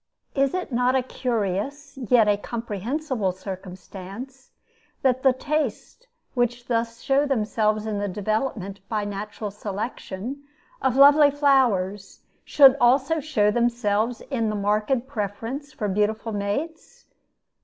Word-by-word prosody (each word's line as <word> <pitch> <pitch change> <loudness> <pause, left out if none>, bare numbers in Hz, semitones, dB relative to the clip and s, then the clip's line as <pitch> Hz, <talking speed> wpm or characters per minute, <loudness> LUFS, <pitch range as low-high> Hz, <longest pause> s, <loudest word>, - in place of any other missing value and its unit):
Is 275 +3 +1
it 365 -5 -3
not 250 +2 +2
a 260 - +2
curious, 250 +4 -3
yet 245 -4 +3
a 205 - +4
comprehensible 230 - -3
circumstance, 190 +7 -9 0.5
that 260 -1 +2
the 265 - +5
tastes 300 - -3 0.3
which 245 -1 0
thus 230 -1 -2
show 275 +2 +2
themselves 215 -4 0
in 210 -2 -2
the 205 - -1
development, 205 0 -2
by 215 -2 -1
natural 205 +1 -5
selection, 210 +4 -5 0.4
of 260 -2 +1
lovely 285 +2 +7
flowers, 235 -10 +1 0.2
should 275 -2 +7
also 270 +6 +3
show 220 -9 +1
themselves 235 -1 0
in 230 -5 0
the 215 - -2
marked 210 +5 0
preference 245 +4 -5
for 220 -5 -3
beautiful 210 +3 0
mates? 215 +11 -4
230 Hz, 125 wpm, -24 LUFS, 205-270 Hz, 0.5 s, lovely